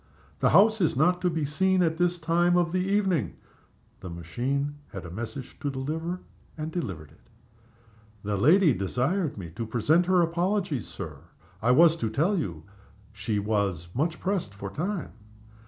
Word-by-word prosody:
"The - - +3
house 215 +5 +5
is 165 - +2
not 180 +6 +3
to 180 - +2
be 160 -3 -1
seen 185 +5 +2
at 160 -1 0
this 175 0 +2
time 175 +2 +2
of 175 -1 +2
the 185 +1 +1
evening." 195 -4 +1 0.6
The 90 - -8
machine 125 - -3
had 95 -2 -8
a 85 - -8
message 120 +6 -7
to 145 - -2
deliver, 160 +7 -3 0.4
and 155 +1 -4
delivered 95 - -5
it. 110 - -22 1.0
"The 105 0 -1
lady 155 - +5
desired 130 - -1
me 85 -5 -7
to 115 - -5
present 155 +10 +2
her 180 -2 +4
apologies, 175 - -1
Sir. 80 -7 -7 0.4
I 115 - +1
was 160 +5 +6
to 115 - -1
tell 155 - +1
you 85 - -3 0.5
she 105 +1 -2
was 100 -5 -1
much 155 +5 -1
pressed 185 - -2
for 100 -1 -6
time. 175 - -3
155 Hz, 165 wpm, -27 LUFS, 105-175 Hz, 1.0 s, was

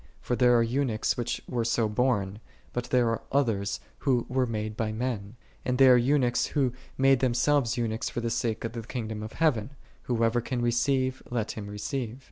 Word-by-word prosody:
For 125 - -2
there 125 -1 +5
are 115 - +4
eunuchs 120 -2 0
who 120 - -2 0.2
were 120 -2 -1
so 115 -1 +1
born: 105 -3 0 0.3
but 120 0 -2
there 120 -1 +2
are 115 - -1
others 105 -7 +1 0.2
who 125 -4 +1
were 130 0 +1
made 110 -1 -3
by 110 -1 -1
men: 110 -2 -3 0.3
and 125 0 0
there 130 -1 +8
are - - +7
eunuchs, 125 0 +2
who 135 -5 0 0.2
made 135 -1 +4
themselves 130 0 +2
eunuchs 115 -1 -1
for - - -4
the 115 -1 -2
sake 115 -1 -1
of 115 - -3
the 115 - -4
kingdom 110 -2 -5
of 110 +1 -7
heaven: 140 -5 +1 0.3
whoso 115 0 +2
can 125 0 -2
receive, 130 +2 +1
let 115 -3 -1
him 105 -2 -7
receive. 115 +3 -4
120 Hz, 190 wpm, -28 LUFS, 110-130 Hz, 0.3 s, there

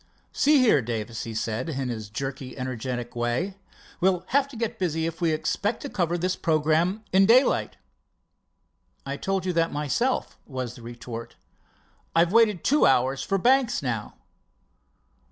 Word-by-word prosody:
"See 300 +1 +4
here, 235 - +5
Davis," 115 -1 -4
he 115 -1 -6
said 110 +6 -2
in 135 -4 -3
his 110 -3 -5
jerky, 135 +4 -5
energetic 125 -1 -4
way, 120 +11 -1 0.5
"we'll 185 -1 +2
have 275 +1 +3
to 280 - -13
get 230 0 -3
busy 160 -3 0
if 165 +1 -5
we 165 -2 +2
expect 205 +7 -1
to 285 - -4
cover 175 -5 0
the 185 +2 0
programme 160 +6 +1
in 195 +1 +6
daylight." 250 +4 +4 1.3
"I 140 0 -3
told 195 +2 -2
you 180 - 0
that 165 0 +1
myself," 150 - -1
was 130 -4 -4
the 125 - -13
retort. 120 0 -8 0.8
"I've 170 +2 +4
waited 220 -6 +4
two 295 +2 +4
hours 130 +1 +2
for 195 - 0
Banks 250 - +2
now." 115 -5 -3
160 Hz, 155 wpm, -26 LUFS, 125-195 Hz, 1.3 s, in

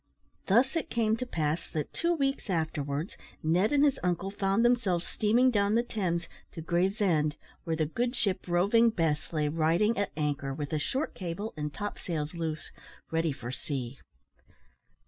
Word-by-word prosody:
Thus 245 - +4
it 330 - -1
came 220 -2 +2
to 255 - -4
pass 155 -5 -1
that, 155 -2 -4
two 340 +1 +1
weeks 275 -6 -1
afterwards, 155 -2 -2 0.3
Ned 175 +7 +3
and 290 0 +5
his 280 - +2
uncle 180 +2 -1
found 200 +3 +1
themselves 210 -8 +2
steaming 240 +5 +3
down 205 -1 +2
the 235 - +3
Thames 180 -8 -2 0.3
to 165 - -6
Gravesend, 175 -3 +1 0.3
where 165 - 0
the 160 -1 +1
good 240 - -1
ship 195 -7 0
Roving 200 +7 +4
Bess 165 -8 -1
lay 155 -2 0
riding 165 +8 +2
at 205 - -1
anchor, 145 -3 -1
with 145 0 -4
a 155 - +1
short 265 - -1
cable, 190 +4 -5
and 150 -1 -3
top 205 +7 -5
sails 155 -3 -3
loose, 160 -2 -4 0.4
ready 165 -1 +1
for 120 -3 -6
sea. 130 -1 -5
175 Hz, 165 wpm, -29 LUFS, 155-220 Hz, 0.4 s, and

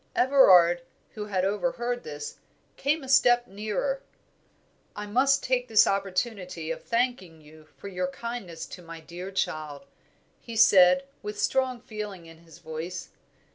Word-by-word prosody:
Everard, 185 -11 +6 0.3
who 210 -1 -6
had 190 -3 -1
overheard 240 +4 -1
this, 150 -1 -7 0.4
came 300 +2 0
a - - -9
step 245 -2 +5
nearer. 215 +7 -3 0.9
"I 210 - -5
must 265 +6 +2
take 255 -1 0
this 220 -3 +6
opportunity 185 -4 -2
of - - -6
thanking 230 -9 -1
you 155 0 -17
for - - -9
your 180 -2 -2
kindness 185 -5 -6
to 180 - -10
my 165 -1 -10
dear 175 +3 -8
child," 155 -5 -3 0.5
he 230 - -9
said, 215 +3 +6 0.2
with 210 0 -6
strong 255 +1 0
feeling 210 -6 -7
in 165 0 -14
his 165 -1 -16
voice. 160 +3 -6
200 Hz, 140 wpm, -27 LUFS, 170-245 Hz, 0.9 s, Everard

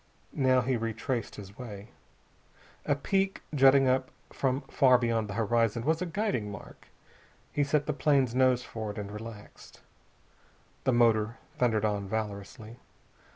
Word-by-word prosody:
Now 130 -2 +3
he 125 +1 0
retraced 115 +1 -3
his 100 +2 -11
way. 105 -4 -8 1.0
A 145 - +3
peak 195 +6 -1
jutting 135 -1 +6
up 130 0 +1 0.2
from 135 0 0
far 130 -2 +4
beyond 115 -3 0
the 100 - -5
horizon 115 +1 +1
was 160 +2 +1
a 180 - -1
guiding 170 - -1
mark. 100 - -11 0.7
He 145 - +2
set 145 0 +1
the 150 - -1
plane's 135 -3 +2
nose 130 -1 +3
for 110 -2 -6
it, 105 - -7
and 100 -1 -5
relaxed. 105 -1 -10 1.0
The - - +4
motor 115 -2 +3 0.2
thundered 110 -3 +2
on 100 -2 -1
valorously. 110 +2 -5
120 Hz, 145 wpm, -29 LUFS, 110-135 Hz, 1.0 s, jutting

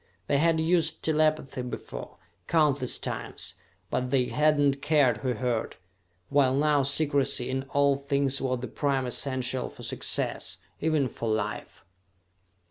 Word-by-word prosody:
They 140 - +1
had 165 +1 +3
used 165 -1 +1
telepathy 155 -4 +1
before, 120 - -7 0.3
countless 145 -6 +2
times, - - -5 0.4
but 125 0 -1
they 130 -1 +2
had 150 0 +3
not 140 -1 +2
cared 145 -3 +3
who 130 -2 -1
heard 120 -1 -2 0.5
while 135 -2 +3
now 145 0 +3
secrecy 140 -3 +2
in 135 +1 -2
all 140 0 +3
things 140 -1 0
was 130 -2 -1
the 125 - -4
prime 135 -3 -1
essential 130 0 -2
for - - -12
success, - - -1 0.2
even 155 -3 +1
for 115 -1 -4
life. 105 -1 -3
140 Hz, 135 wpm, -27 LUFS, 130-150 Hz, 0.5 s, had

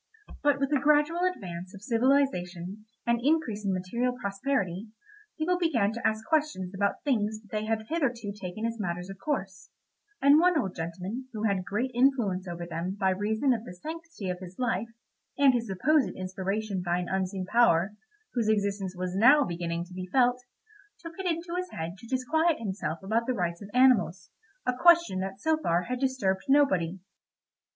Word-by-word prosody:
But 290 -2 +3
with 275 +1 0
the 290 - +3
gradual 300 +5 +3
advance 185 - -8
of 200 - -12
civilisation 215 -7 0 0.2
and 235 0 +1
increase 275 -8 +1
in 200 - 0
material 235 +7 -1
prosperity, 200 -2 -2 0.5
people 355 +3 +1
began 235 - +2
to 235 - 0
ask 220 0 -2
questions 300 - 0
about 200 +1 -1
things 220 -6 0
that 210 -2 -22
they 215 0 -2
had 220 0 -1
hitherto 245 -9 -1
taken 200 +2 -5
as 230 0 -3
matters 180 -1 -3
of 195 - -11
course, 195 -8 -3 0.5
and 280 +2 +6
one 355 -1 +4
old 190 -7 -2
gentleman, 185 +9 -5
who 215 -1 -4
had 200 -4 +1
great 225 +7 -2
influence 235 -8 +2
over 175 0 -5
them 170 +3 -4
by 190 -1 +3
reason 220 +7 +1
of 225 -2 -3
the 180 - -9
sanctity 325 - -7
of 180 - -5
his 185 0 -10
life, 230 -4 0 0.5
and 280 -2 +6
his 235 -1 -1
supposed 270 +10 +2
inspiration 190 +2 -3
by 175 0 0
an 180 0 -3
unseen 190 0 -2
power, 200 -3 +3 0.4
whose 230 -3 +1
existence 200 -3 0
was 180 0 -3
now 265 +9 +6
beginning 170 -3 -3
to 180 - -14
be 185 0 -5
felt, 250 -1 +3 0.6
took 335 -1 -9
it 380 - -2
into 335 0 -2
his 365 0 -2
head 165 +2 -5
to 230 - -12
disquiet 300 +6 +1
himself 190 -7 -3
about 225 +4 0
the 255 - 0
rights 170 -3 -2
of 200 - -9
animals—a 250 - +1
question 340 - +5
that 195 +1 -4
so 315 +7 +2
far 175 - +1
had 250 +5 -3
disturbed 250 -8 0
nobody. 190 - +3
215 Hz, 175 wpm, -28 LUFS, 185-270 Hz, 0.6 s, and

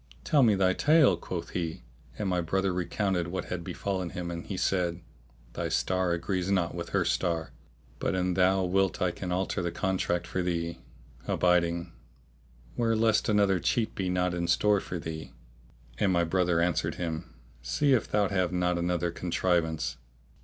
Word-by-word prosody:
"Tell 145 - +3
me 110 -5 +5
thy 95 -1 +3
tale," 150 - +5
quoth 85 0 -6
he; 80 -6 -3 0.3
and 105 - -2
my 90 -1 +1
brother 95 +3 0
recounted 90 0 -1
what 95 +2 -3
had 90 -2 -4
befallen 95 0 -3
him 85 0 -5
and 85 0 -5
he 95 - -5
said, 90 -2 0 0.5
"Thy - - -3
star 95 -1 +1
agrees 90 +2 -2
not 90 -4 +1
with - - -5
her - - +1
star; 85 -3 0 0.5
but - - 0
an 90 0 0
thou 95 +1 +3
wilt 95 +2 +1
I 90 -2 +1
can 90 +1 -5
alter 90 0 -1
the 85 - -1
contract 90 -1 -1
for 95 - -2
thee," 85 -1 -2 0.5
adding, 85 -1 +2 0.8
"'Ware 115 -1 +1
lest 110 -1 +2
another 100 -3 +3
cheat 110 +6 0
be 95 -4 -2
not 90 0 +1
in 85 -1 -2
store 105 +4 +3
for 90 - -5
thee." 80 -1 -6 0.7
And 100 - +3
my 85 -1 +3
brother 90 0 +1
answered 85 0 0
him, 80 -7 -5 0.3
"See 140 - +2
if 125 - +2
thou 105 -1 +2
have 95 -3 0
not 90 -1 +1
another 85 0 0
contrivance." 85 -5 0
90 Hz, 170 wpm, -29 LUFS, 85-95 Hz, 0.8 s, me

